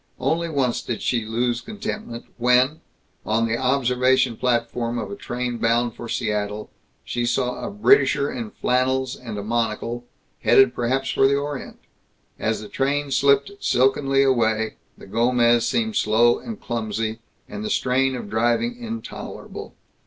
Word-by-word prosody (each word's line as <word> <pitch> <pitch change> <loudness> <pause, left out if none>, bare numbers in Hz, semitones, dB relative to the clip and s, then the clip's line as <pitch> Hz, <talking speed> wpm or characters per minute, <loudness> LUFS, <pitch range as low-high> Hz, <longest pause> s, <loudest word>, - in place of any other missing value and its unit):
Only 165 +6 0
once 135 -6 0
did 120 - -4
she 115 -3 0
lose 120 +2 -1
contentment 210 - -6
when, 125 +5 +3 0.4
on 110 +3 +1
the 115 0 0
observation 130 -1 +2
platform 120 0 -1
of - - -4
a - - -4
train 125 - -4
bound 120 +1 +1
for 120 0 -8
Seattle, 105 -2 -2 0.3
she 120 - -2
saw 125 +1 -1
a - - -3
Britisher 200 - +3
in 115 -4 -5
flannels 130 +2 0
and 115 -4 -7
a 100 - -4
monocle, 115 +2 -2 0.4
headed 130 -2 +5
perhaps 130 +3 -1
for 135 - +4
the 140 - +2
Orient. 145 -1 -4 0.6
As 110 0 -1
the 105 - -8
train 140 +4 -1
slipped 140 +4 +3
silkenly 135 0 +2
away, 110 -4 +1 0.2
the - - -12
Gomez 120 +2 +3
seemed 225 -2 0
slow 120 - +3
and 225 -3 -7
clumsy, 110 -1 -3 0.3
and 210 - -6
the 215 - -3
strain 130 -5 +1
of 125 - -6
driving 120 - +1
intolerable. 230 0 -7
125 Hz, 145 wpm, -23 LUFS, 115-135 Hz, 0.6 s, headed